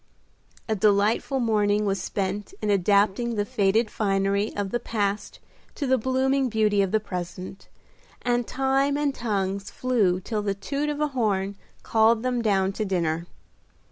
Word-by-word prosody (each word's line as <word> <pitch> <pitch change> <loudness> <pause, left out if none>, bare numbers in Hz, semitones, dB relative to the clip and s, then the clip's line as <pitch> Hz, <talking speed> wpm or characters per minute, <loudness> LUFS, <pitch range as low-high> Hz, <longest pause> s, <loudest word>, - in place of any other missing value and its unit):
A 220 - +1
delightful 215 +6 +2
morning 210 -3 +2
was 195 -1 0
spent 200 - -3
in 210 - 0
adapting 205 +4 +2
the 205 -1 0
faded 210 +2 +1
finery 200 0 0
of 200 -2 -2
the 240 - 0
past 205 -3 -2 0.4
to 290 - -3
the 260 -1 +2
blooming 260 +2 +1
beauty 210 -2 +2
of 195 - +1
the 220 - +3
present, 185 -1 -7 0.6
and 245 -1 0
time 270 +2 +1
and 290 -1 0
tongues 200 -4 -2
flew 215 -8 +1
till 210 +3 -3
the 200 -1 -1
toot 280 +9 -2
of 295 0 -3
a 300 - +1
horn 200 -6 -1 0.3
called 225 +1 +3
them 250 -1 0
down 195 -3 +1
to 215 - -2
dinner. 170 -4 -1
210 Hz, 155 wpm, -25 LUFS, 195-240 Hz, 0.6 s, the